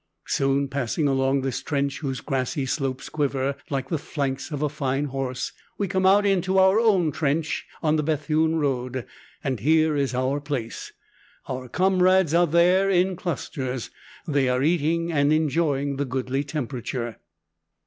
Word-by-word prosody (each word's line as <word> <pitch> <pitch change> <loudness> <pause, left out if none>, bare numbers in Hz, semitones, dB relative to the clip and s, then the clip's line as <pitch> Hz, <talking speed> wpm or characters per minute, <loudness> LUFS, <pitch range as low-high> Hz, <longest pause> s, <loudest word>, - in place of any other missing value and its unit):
Soon, 140 +1 +1
passing 140 +2 -1
along 135 0 +2
this 130 -1 -2
trench 140 -2 -1
whose 135 -4 -3
grassy 135 0 -2
slopes 130 -1 -2
quiver 140 -2 -1
like 135 -2 -2
the 160 - -1
flanks 140 -2 -3
of 150 -2 -3
a - - +3
fine 140 -1 -1
horse, 135 -2 -3 0.3
we 200 - -1
come 190 0 +1
out 205 +2 +5
into 190 -1 +2
our 190 +2 +5
own 195 -9 +3
trench 155 +2 -1 0.2
on 155 0 +3
the - - +2
Bethune 155 +1 +1
road, 130 -4 -1 0.4
and 130 -5 -1
here 155 +5 +3
is 140 -3 0
our 130 +3 0
place. 140 -6 -4 0.6
Our 130 -1 -4
comrades 185 -1 +3
are 175 +1 +4
there, 180 +4 +4
in 185 0 +2
clusters. 130 -8 -4 0.4
They 140 -4 +2
are 125 +1 +1
eating, 165 +1 +1
and 145 -2 +2
enjoying 145 -2 +1
the 140 - -1
goodly 130 +1 -2
temperature. 125 -5 -4
145 Hz, 155 wpm, -24 LUFS, 135-165 Hz, 0.6 s, out